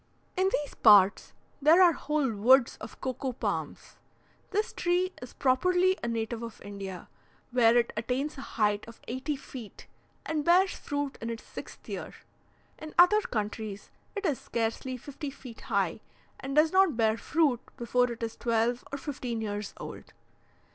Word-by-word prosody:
In 375 +1 +2
these 295 -1 -1
parts, 205 -3 +6 0.3
there 315 +5 +6
are 360 -2 +8
whole 300 -4 0
woods 235 +5 +5
of - - -9
cocoa 260 0 -3
palms. - - -4 0.5
This 425 +2 -1
tree 360 +1 0
is 250 - -9
properly 360 +8 +3
a 235 - -3
native 230 0 -2
of 230 -1 -7
India, 195 -2 -7 0.4
where 240 -1 +5
it 235 -1 +1
attains 255 +7 -2
a 270 - -7 0.2
height 210 -1 +2
of 230 - -12
eighty 260 +4 -2
feet, 255 -5 -10 0.4
and 310 -2 -1
bears 365 +3 +5
fruit 285 -1 -4
in 230 - -3
its 230 -1 -5
sixth - - -10
year. - - -6 0.6
In 310 0 -9
other 360 +5 +7
countries, 215 - -4 0.2
it 405 0 -3
is 290 -8 +1
scarcely 235 +3 -2
fifty 285 +3 -7
feet 255 -4 -11
high, 200 -4 0 0.4
and 270 +1 -5
does 310 +1 +5
not 375 -8 +4
bear 220 -2 +3
fruit 285 0 +1 0.2
before 245 +1 +1
it 235 0 -6
is 225 0 -3
twelve 235 +1 0
or 280 - -3
fifteen 255 -5 -4
years 205 -2 -4
old. - - -9
250 Hz, 160 wpm, -29 LUFS, 225-300 Hz, 0.6 s, are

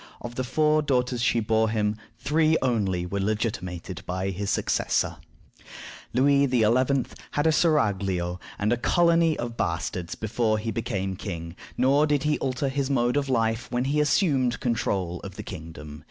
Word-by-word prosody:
Of 120 - -7
the 130 - -2
four 155 +4 +2
daughters 125 -4 0
she 115 0 +2
bore 110 0 +2
him, 105 -1 0 0.2
three 155 +5 +2
only 100 -8 0
were 100 +3 -3
legitimated 95 -4 -3
by 95 +2 -2
his 100 +2 -3
successor. - - 0 0.9
Louis 140 +3 +4
XI. 125 -2 +2 0.7
had 145 - 0
a 160 - +5
seraglio 100 - +1 0.2
and 105 +3 +1
a - - 0
colony 165 +4 +3
of 120 -1 -5
bastards 85 +1 -2
before 110 0 0
he 110 +1 -3
became 100 -5 -2
king, 85 -4 -6 0.2
nor 140 +4 +4
did 145 -2 +1
he 150 -1 +1
alter 130 +1 -1
his 135 0 -1
mode 120 -2 +1
of 140 -1 0
life 115 -2 0
when 125 +1 0
he 145 +3 +1
assumed 140 -5 +2
control 95 -7 -1
of - - -9
the - - -6
kingdom. 75 -2 -9
115 Hz, 160 wpm, -26 LUFS, 95-140 Hz, 0.9 s, a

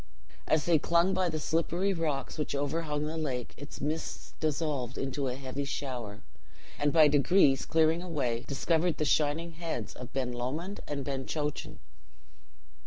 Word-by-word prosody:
As 155 -1 +3
they 170 -3 +5
clung 170 +5 +3
by 185 -2 +2
the 155 - -2
slippery 170 +5 +1
rocks 155 -4 -2
which 150 - -1
overhung 150 +1 -1
the 155 +1 -3
lake, 130 -6 -3
its 145 +1 -9
mists 155 +3 -3
dissolved 145 -5 -1
into 135 +1 -2
a 125 - -1
heavy 135 +1 -4
shower, 125 -7 -4 0.6
and, 145 0 +2
by 155 -1 +7
degrees 145 -1 +4
clearing 160 +1 +3
away, 135 -10 -1
discovered 165 +4 +1
the 155 - 0
shining 155 +3 +2
heads 160 -9 -4
of 125 0 -9
Ben 130 -2 -1
Lomond 145 +11 -3
and 140 -2 -3
Ben 135 -2 -3
Chochan. 150 -2 -3
150 Hz, 155 wpm, -30 LUFS, 135-165 Hz, 0.6 s, by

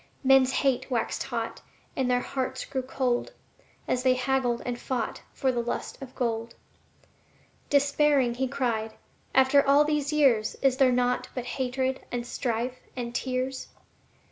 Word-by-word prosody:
Men's 265 -1 +5
hate 260 -1 +1
waxed 235 -3 -1
hot, - - -4 0.3
and 260 -2 0
their 245 0 +2
hearts 260 0 -3
grew 265 - -2
cold, 255 - -1 0.5
As 250 - +1
they 255 0 +3
haggled 255 -2 0
and 245 -1 -3
fought 245 -4 -3
for 265 - 0
the 240 -1 -1
lust 240 +3 -4
of 260 -1 -9
gold. 230 -2 -2 1.1
Despairing, 285 -3 +3
he 260 +2 -1
cried, 235 -5 -2 0.4
"After 265 +2 +6
all 280 +2 +5
these 300 -1 0
years 265 -8 +3
Is 265 -1 +3
there 265 -2 +5
naught 250 0 +1
but 250 -2 -3
hatred 260 +1 -2
and 240 -1 -3
strife 245 0 -2 0.2
and 240 -2 -4
tears?" 255 +1 -2
255 Hz, 145 wpm, -27 LUFS, 245-270 Hz, 1.1 s, After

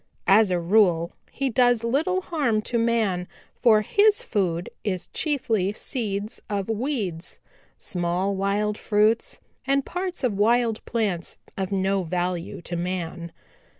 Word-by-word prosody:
"As 205 +1 +5
a 180 -1 +1
rule 175 -2 +3 0.2
he 270 -1 -2
does 245 -1 +3
little 315 +11 +1
harm 275 -12 0
to 235 +1 -1
man, 220 -6 +1 0.3
for 220 -3 +4
his 415 - +3
food 180 -5 -1 0.2
is 185 -4 -2
chiefly 225 - 0
seeds 210 -3 -3
of 200 0 -2
weeds, 215 - -3 0.4
small 180 +2 -1
wild 205 +2 0
fruits 215 +2 +1 0.3
and 275 0 +2
parts 360 -3 -4
of 245 -4 +1
wild 230 +1 +2
plants 205 -7 -2 0.2
of 190 -1 -3
no 195 0 +1
value 180 +1 -3
to 175 - -4
man. 170 -1 -4
210 Hz, 130 wpm, -24 LUFS, 180-235 Hz, 0.4 s, As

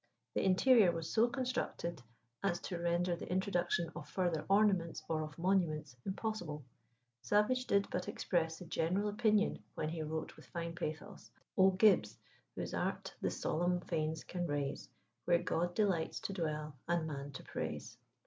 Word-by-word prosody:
The - - +1
interior 195 +1 +6
was 165 -1 -4
so 225 +2 +5
constructed 250 - -2 0.4
as 185 -3 +1
to 175 - -4
render 175 +1 +1
the - - -8
introduction 175 -3 +1
of 150 - -7
further 175 -4 0
ornaments 195 -5 +3
or 160 -1 0
of 155 -1 -6
monuments 165 -7 +1
impossible. 190 -7 -3 0.6
Savage 250 - +2
did 200 0 +3
but 180 0 -2
express 165 -2 0
the 180 - -9
general 180 +5 0
opinion 215 0 +2
when 155 - -1
he 160 0 -3
wrote 155 +1 -3
with - - -15
fine 170 -1 -4
pathos 175 +4 -5 0.3
"O 190 0 +7
Gibbs! 185 - +4 0.4
whose - - -4
art - - -2
the - - +1
solemn 175 +2 0
fanes 160 -2 -2
can 175 -1 -3
raise, 145 -2 -2 0.4
Where 175 -1 +5
God 175 +1 0
delights 190 -7 +1
to 195 - -3
dwell 155 -4 -2
and 170 -2 +1
man 140 -2 -4
to - - -7
praise." - - -5
175 Hz, 160 wpm, -35 LUFS, 160-195 Hz, 0.6 s, O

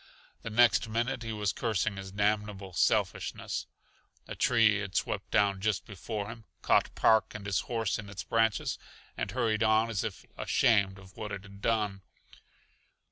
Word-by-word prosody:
The - - -5
next 115 0 +4
minute 120 +2 -1
he 115 -1 -4
was 105 -3 -1
cursing 110 -3 -1
his 95 0 -7
damnable 100 -1 -1
selfishness. - - 0 0.6
A - - -5
tree 110 -4 +4
had 100 -2 -6
swept - - -1
down 100 -2 +2
just 105 -2 0
before 105 +1 -5
him, 115 -1 -10 0.2
caught - - +3
Park 110 -1 +3
and 105 -2 -7
his 100 -1 +1
horse 115 -4 0
in 105 -1 -8
its 100 -2 -6
branches 115 -4 +1 0.4
and - - -3
hurried 115 -4 0
on 110 +1 +3
as 100 - -1
if - - -5
ashamed 100 -4 +2
of 95 -1 -15
what 105 -1 -5
it 100 -1 -5
had 100 -1 -13
done. 105 -4 0
105 Hz, 165 wpm, -30 LUFS, 100-115 Hz, 0.6 s, next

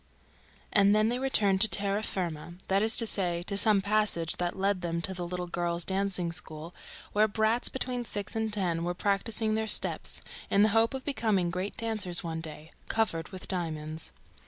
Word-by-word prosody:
And 200 0 +5
then 215 +1 +3
they 245 +1 -1
returned 205 -8 +2
to 220 - +8
terra 200 0 0
firma, 170 -5 -4
that 195 +1 +3
is 220 +2 +4
to 230 - +7
say, 175 -5 +1
to 200 - 0
some 200 -1 +5
passage 205 -6 +1
that 175 +1 -2
led 195 -1 0
them 170 -1 -2
to 190 - -3
the 180 -1 -5
little 180 0 -4
girls' 175 0 -3
dancing 190 -3 -1
school, 165 -1 -4 0.4
where 215 +1 +4
brats 220 +3 0
between 250 -2 -2
six 205 -3 -4
and 220 -1 -1
ten 175 -5 -1
were 175 +1 -2
practising 215 +3 0
their 220 0 -1
steps, - - +2 0.3
in 200 - +4
the 215 - +4
hope 225 +4 +2
of 265 - -7
becoming 215 -10 0
great 185 +3 -4
dancers 215 -7 +1
one 165 -1 -4
day, 155 0 -9 0.2
"covered 185 -8 -1
with 185 -2 -7
diamonds 160 -3 -4
195 Hz, 185 wpm, -29 LUFS, 175-215 Hz, 0.4 s, to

